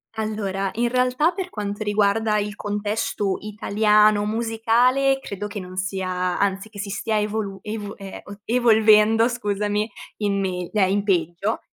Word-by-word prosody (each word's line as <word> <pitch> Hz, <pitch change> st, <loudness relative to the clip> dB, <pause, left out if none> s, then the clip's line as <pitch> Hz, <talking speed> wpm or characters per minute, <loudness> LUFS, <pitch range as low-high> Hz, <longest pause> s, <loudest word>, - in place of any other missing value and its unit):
Allora, 200 Hz, -3 st, -2 dB
in 235 Hz, +1 st, 0 dB
realtà 255 Hz, +6 st, +2 dB
per 370 Hz, -2 st, -5 dB
quanto 205 Hz, -, -4 dB
riguarda 210 Hz, +1 st, +2 dB
il 205 Hz, 0 st, -3 dB
contesto 205 Hz, -1 st, -2 dB
italiano 210 Hz, 0 st, +3 dB
musicale 235 Hz, +5 st, +2 dB
credo 205 Hz, -5 st, -6 dB
che 205 Hz, 0 st, -6 dB
non 185 Hz, -1 st, -9 dB
sia 185 Hz, -1 st, -2 dB
anzi 200 Hz, +1 st, 0 dB
che 210 Hz, -2 st, -11 dB
si 200 Hz, 0 st, -4 dB
stia 215 Hz, +2 st, -1 dB
evolu 210 Hz, -2 st, -3 dB
ev 210 Hz, -1 st, -5 dB
eh, 195 Hz, -1 st, -9 dB, 0.2 s
evolvendo 225 Hz, -1 st, +5 dB
scusami, 210 Hz, -2 st, -1 dB, 0.3 s
in 200 Hz, -2 st, 0 dB
megl 180 Hz, -2 st, -3 dB
eh 190 Hz, -2 st, +4 dB
in 200 Hz, +1 st, +1 dB
peggio, 180 Hz, +2 st, 0 dB
210 Hz, 145 wpm, -23 LUFS, 200-220 Hz, 0.3 s, evolvendo